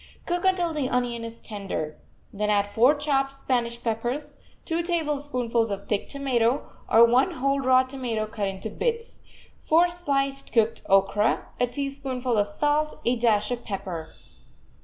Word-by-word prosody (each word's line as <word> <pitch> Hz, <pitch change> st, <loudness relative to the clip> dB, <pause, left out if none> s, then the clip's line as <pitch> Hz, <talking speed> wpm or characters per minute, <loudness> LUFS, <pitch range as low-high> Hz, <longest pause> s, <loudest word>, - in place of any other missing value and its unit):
Cook 350 Hz, +1 st, -1 dB
until 360 Hz, -3 st, +2 dB
the 285 Hz, -4 st, -1 dB
onion 245 Hz, -2 st, -1 dB
is 230 Hz, 0 st, -7 dB
tender. 195 Hz, -8 st, -5 dB, 0.3 s
Then 210 Hz, +1 st, -1 dB
add 205 Hz, -1 st, +3 dB
four 235 Hz, +8 st, +4 dB
chopped 275 Hz, -2 st, 0 dB
Spanish 240 Hz, -3 st, -1 dB
peppers, 240 Hz, +6 st, -2 dB, 0.2 s
two 335 Hz, 0 st, 0 dB
tablespoonfuls 290 Hz, -9 st, -1 dB
of 200 Hz, 0 st, -5 dB
thick 205 Hz, -2 st, -1 dB
tomato, 260 Hz, -3 st, +1 dB, 0.2 s
or 230 Hz, +1 st, +8 dB
one 245 Hz, +3 st, +3 dB
whole 275 Hz, +2 st, 0 dB
raw 260 Hz, -1 st, +4 dB
tomato 250 Hz, -5 st, -3 dB
cut 215 Hz, -2 st, -3 dB
into 195 Hz, +2 st, -5 dB
bits, 465 Hz, -, -3 dB, 0.4 s
four 345 Hz, +3 st, +4 dB
sliced 275 Hz, -5 st, -1 dB
cooked 225 Hz, -1 st, +2 dB
okra, 195 Hz, +2 st, +2 dB
a 245 Hz, -, +3 dB
teaspoonful 270 Hz, -2 st, -2 dB
of 205 Hz, -, +2 dB
salt, 295 Hz, +8 st, 0 dB
a 240 Hz, -, +3 dB
dash 225 Hz, -2 st, +2 dB
of 240 Hz, -1 st, -3 dB
pepper. 185 Hz, -6 st, -5 dB
245 Hz, 150 wpm, -26 LUFS, 220-280 Hz, 0.4 s, or